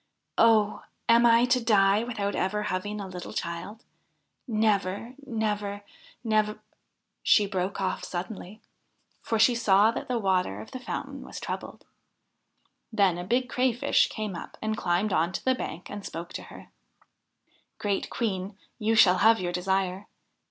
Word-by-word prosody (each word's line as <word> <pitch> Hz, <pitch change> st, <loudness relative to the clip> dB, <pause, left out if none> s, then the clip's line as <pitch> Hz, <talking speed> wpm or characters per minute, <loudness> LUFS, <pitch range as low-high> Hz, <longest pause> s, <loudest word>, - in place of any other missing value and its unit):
Oh 220 Hz, -2 st, +4 dB, 0.3 s
1 -, -, -17 dB
am 235 Hz, -, +4 dB
I 230 Hz, +1 st, +6 dB
to 250 Hz, -1 st, +2 dB
die 200 Hz, -2 st, +4 dB
without 210 Hz, -4 st, -2 dB
ever 210 Hz, +3 st, -1 dB
having 205 Hz, +2 st, -3 dB
a 200 Hz, -, -4 dB
little 180 Hz, -1 st, -8 dB
child? 185 Hz, +7 st, -5 dB, 0.6 s
Never 215 Hz, -4 st, +1 dB, 0.2 s
I -, -, -22 dB
Never 210 Hz, -3 st, -1 dB
I 205 Hz, 0 st, -10 dB, 0.4 s
Nev 215 Hz, -2 st, +1 dB, 0.3 s
' -, -, -51 dB, 0.3 s
She 210 Hz, -, +5 dB
broke 195 Hz, -1 st, -2 dB
off 190 Hz, -, -2 dB
suddenly, 190 Hz, +3 st, -6 dB, 0.6 s
for 225 Hz, -, -1 dB
she 220 Hz, +3 st, +5 dB
saw 215 Hz, -2 st, +4 dB
that -, -, -5 dB
the 250 Hz, -, 0 dB
water 185 Hz, -, 0 dB
of 105 Hz, -, -10 dB
the 255 Hz, -, -6 dB
fountain 250 Hz, -, -5 dB
was -, -, -8 dB
troubled. -, -, -6 dB, 1.1 s
Then 195 Hz, -5 st, +2 dB
a -, -, -4 dB
big 245 Hz, +7 st, +1 dB
Crayfish 250 Hz, -1 st, +2 dB
came 215 Hz, -4 st, -4 dB
up 170 Hz, -, -9 dB
and 220 Hz, 0 st, -2 dB
climbed 185 Hz, +1 st, 0 dB
on 170 Hz, +4 st, +1 dB
to -, -, -5 dB
the 260 Hz, -, +4 dB
bank 175 Hz, -8 st, -6 dB
and 205 Hz, -1 st, -6 dB
spoke 170 Hz, -1 st, -7 dB
to -, -, -5 dB
her: -, -, -13 dB, 0.6 s
' -, -, -53 dB, 0.3 s
Great 200 Hz, -2 st, -1 dB
Queen, 195 Hz, -3 st, -3 dB, 0.2 s
you 220 Hz, +1 st, +1 dB
shall 185 Hz, -4 st, +6 dB
have 225 Hz, 0 st, +5 dB
your 175 Hz, -1 st, -2 dB
desire. 190 Hz, +2 st, -1 dB
205 Hz, 165 wpm, -27 LUFS, 185-225 Hz, 1.1 s, I